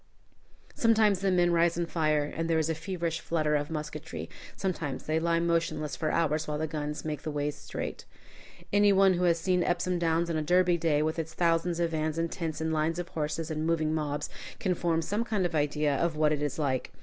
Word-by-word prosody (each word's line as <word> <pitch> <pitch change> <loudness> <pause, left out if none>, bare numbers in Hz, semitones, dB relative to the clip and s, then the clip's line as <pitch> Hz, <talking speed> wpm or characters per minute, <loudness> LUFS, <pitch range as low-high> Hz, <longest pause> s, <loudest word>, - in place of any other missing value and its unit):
Sometimes 220 -4 +3
the 195 0 +1
men 175 -1 +3
rise 170 0 +3
and 170 -1 -1
fire, 155 -3 +1
and 165 +3 -3
there 165 - +3
is 160 0 +1
a - - +1
feverish 170 0 -3
flutter 155 -2 0
of 145 0 -1
musketry; 155 -2 -5 0.2
sometimes 165 -8 -3
they 155 +1 0
lie 165 0 +1
motionless 160 -4 0
for 155 +4 -1
hours 155 -1 +1
while 150 -1 -2
the 155 - -1
guns 150 -1 -4
make 150 -2 -3
the - - -4
ways 145 0 -1
straight. - - -6 0.7
Any 205 0 +5
one 195 -1 +5
who 180 0 +1
has 170 -1 +4
seen 180 +2 +1
Epsom 175 +1 0
Downs 165 0 +1
on 160 - 0
a - - 0
Derby 180 +2 +3
day, 155 -2 +2
with 155 +1 -1
its 160 0 -5
thousands 170 0 +1
of 170 -1 +1
vans 155 0 -1
and 165 0 -1
tents 165 -3 -3
and 160 0 -1
lines 160 +2 0
of 175 -1 -4
horses 155 +1 -3
and 155 0 -2
moving 160 -2 +1
mobs, 150 -2 -2 0.3
can 185 -3 +1
form 165 -1 0
some 210 +7 -1
idea 150 -7 +1
of 170 +1 0
what 155 0 +3
it 145 - -2
is 145 -2 -2
like. 135 -4 -1
160 Hz, 215 wpm, -29 LUFS, 155-175 Hz, 0.7 s, Any